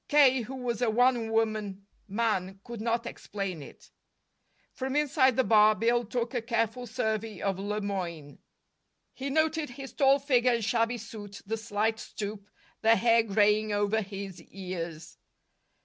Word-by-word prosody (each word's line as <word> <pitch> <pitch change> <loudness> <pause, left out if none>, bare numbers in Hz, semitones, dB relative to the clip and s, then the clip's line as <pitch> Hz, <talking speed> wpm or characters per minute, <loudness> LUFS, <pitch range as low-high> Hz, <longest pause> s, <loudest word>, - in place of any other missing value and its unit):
K., 270 -4 +5
who 250 +4 -7
was 245 -3 -3
a 240 - +3
one 240 0 +3
woman 215 -3 -1 0.2
man, 195 -3 -1
could 235 -3 -7
not 230 +1 0
explain 195 -8 -5
it. - - -14 0.8
From 265 +1 -3
inside 280 -4 +3
the 260 - +3
bar 215 -2 +5
Bill 235 +2 +1
took 235 +3 -2
a 245 - -1
careful 230 +1 -1
survey 220 -2 -2
of 195 -2 -1
Le 210 +2 -2
Moyne. 170 -7 -5 0.7
He 275 +1 -5
noted 315 +1 +1
his 270 +2 -9
tall 275 -1 +5
figure 255 -3 +2
and 230 -3 -1
shabby 230 +1 +1
suit, 205 -2 -9
the 220 +3 -2
slight 220 0 -1
stoop, 205 -1 -6 0.3
the 225 +1 +5
hair 230 0 +4
graying 210 0 +2
over 205 +2 +1
his 195 -3 -7
ears. 170 -3 -7
225 Hz, 150 wpm, -29 LUFS, 205-245 Hz, 0.8 s, K